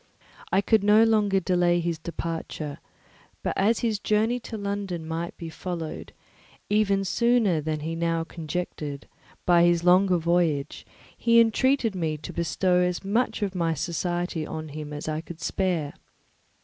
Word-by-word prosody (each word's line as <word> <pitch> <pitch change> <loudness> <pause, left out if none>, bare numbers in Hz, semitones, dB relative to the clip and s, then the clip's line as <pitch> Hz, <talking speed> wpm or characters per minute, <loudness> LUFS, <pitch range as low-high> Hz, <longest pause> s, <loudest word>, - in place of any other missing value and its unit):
He 195 +1 +3
could 220 -1 +3
not 210 +2 +6
any - - +6
longer 210 -3 +3
delay 175 -1 +2
his 170 -1 -2
departure; 165 -3 -5 0.6
but - - -1
as 215 +4 +2
his 220 -3 0
journey 220 +4 +1
to 230 -1 -7
London 200 -5 -4
might 165 +1 -4
be 165 - -7
followed, 165 -1 -6 0.6
even 200 -2 +2
sooner 225 -6 +2
than 155 0 -3
he 160 +2 -3
now 165 0 0
conjectured, 155 -3 -5 0.4
by 175 -1 +5
his 175 -1 +3
longer 180 +1 +5
voyage, 165 -4 0 0.3
he 235 0 +4
entreated 230 +1 +3
me 160 -4 -2
to 150 - -8
bestow 180 +2 +1
as 180 0 0
much 215 +2 0
of 195 -2 -2
my 165 -3 0
society 175 +1 -2
on 155 0 -6
him 150 0 -7
as 150 +1 -6
I 155 0 -2
could 165 0 -10
spare. 170 -6 -1
175 Hz, 155 wpm, -26 LUFS, 165-200 Hz, 0.6 s, not